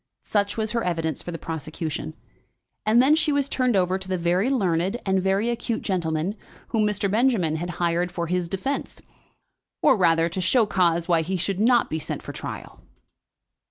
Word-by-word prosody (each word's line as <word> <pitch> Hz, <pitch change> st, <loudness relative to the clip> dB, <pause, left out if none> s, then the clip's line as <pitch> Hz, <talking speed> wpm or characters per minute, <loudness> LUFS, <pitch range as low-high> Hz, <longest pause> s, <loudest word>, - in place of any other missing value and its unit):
Such 205 Hz, 0 st, 0 dB
was 220 Hz, -1 st, -1 dB
her 235 Hz, -1 st, -1 dB
evidence 165 Hz, -4 st, -1 dB
for -, -, -8 dB
the 165 Hz, -, -5 dB
prosecution, 155 Hz, -, -5 dB, 0.7 s
and 235 Hz, +3 st, +5 dB
then 290 Hz, +3 st, +5 dB
she 315 Hz, -1 st, +1 dB
was 285 Hz, -1 st, +1 dB
turned 255 Hz, -4 st, +1 dB
over 185 Hz, 0 st, +2 dB
to 190 Hz, -, -8 dB
the 185 Hz, 0 st, -1 dB
very 180 Hz, +7 st, +1 dB
learned 190 Hz, -4 st, 0 dB
and 190 Hz, -1 st, +2 dB
very 195 Hz, +4 st, +1 dB
acute 235 Hz, -1 st, -3 dB
gentleman 170 Hz, -1 st, -1 dB, 0.4 s
whom 215 Hz, -2 st, +2 dB
Mr. 205 Hz, -1 st, 0 dB
Benjamin 205 Hz, -7 st, +2 dB
had 175 Hz, +2 st, -4 dB
hired 175 Hz, +1 st, 0 dB
for 170 Hz, -1 st, -3 dB
his 175 Hz, 0 st, -1 dB
defence, 265 Hz, +10 st, -3 dB, 0.8 s
or 285 Hz, -, +6 dB
rather, 165 Hz, -3 st, +3 dB
to 170 Hz, +2 st, -4 dB
show 225 Hz, +6 st, +3 dB
cause 170 Hz, -4 st, +1 dB
why 170 Hz, -2 st, +3 dB
he 185 Hz, +4 st, -2 dB
should 190 Hz, +2 st, -2 dB
not 240 Hz, +2 st, +4 dB
be 160 Hz, -, -3 dB
sent -, -, -5 dB
for -, -, -7 dB
trial. -, -, -8 dB
185 Hz, 185 wpm, -24 LUFS, 170-220 Hz, 0.8 s, or